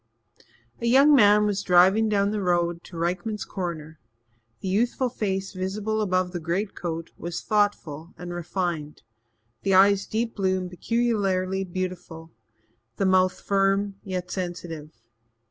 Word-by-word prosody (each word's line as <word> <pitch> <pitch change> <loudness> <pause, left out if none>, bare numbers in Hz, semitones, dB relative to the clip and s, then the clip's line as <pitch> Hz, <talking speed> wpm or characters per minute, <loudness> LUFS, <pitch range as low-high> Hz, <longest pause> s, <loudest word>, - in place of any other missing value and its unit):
A 235 - 0
young 275 +5 +6
man 210 -5 +6
was 205 -1 0
driving 190 +4 +4
down 200 -1 +2
the 210 -1 -2
road 175 -2 0
to 175 - -10
Rykman's 185 +5 -2
Corner; 160 -4 -5 0.6
the - - -6
youthful 240 +6 +1
face 195 -4 -3
visible 205 +3 -2
above 185 -3 0
the 175 - -4
greatcoat 170 -1 -3
was 170 0 -4
thoughtful 180 -7 -1
and 175 0 -7
refined, 175 -3 -3 0.6
the 195 -1 +2
eyes 200 +1 +5
deep 225 +1 -2
blue 190 -2 +1
and 180 -1 -5
peculiarly 195 -3 0
beautiful, 180 -3 -6 0.6
the 195 - 0
mouth 185 -1 +3
firm 195 0 +1
yet 185 -2 -4
sensitive. 175 -4 -5
190 Hz, 130 wpm, -25 LUFS, 175-205 Hz, 0.6 s, young